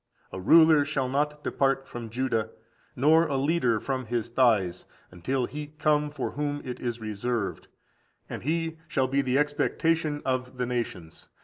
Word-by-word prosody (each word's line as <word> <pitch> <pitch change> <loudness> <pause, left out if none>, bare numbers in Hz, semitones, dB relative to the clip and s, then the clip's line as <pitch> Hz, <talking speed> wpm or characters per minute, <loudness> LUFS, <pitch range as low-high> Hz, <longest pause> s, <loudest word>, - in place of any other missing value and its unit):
A - - -6
ruler 160 - +6
shall 140 -3 -1
not 150 +3 -1
depart 135 0 0
from 120 -2 -7
Judah, 115 -2 -1 0.5
nor 160 +5 +4
a 140 - -1
leader 135 -5 +1
from 130 -1 -3
his 120 0 -2
thighs, 110 -8 +2 0.2
until 125 +9 -1
he 150 +3 -6
come 150 -1 +2
for 145 -3 -4
whom 145 0 -2
it 125 -1 -5
is 120 -1 -3
reserved; 110 0 -3 0.6
and - - -6
he 160 +2 -2
shall 135 -4 +1
be 135 +2 +1
the 130 -1 0
expectation 150 +1 0
of 130 -1 -2
the 125 - 0
nations. 115 -10 -5
130 Hz, 155 wpm, -27 LUFS, 120-150 Hz, 0.6 s, ruler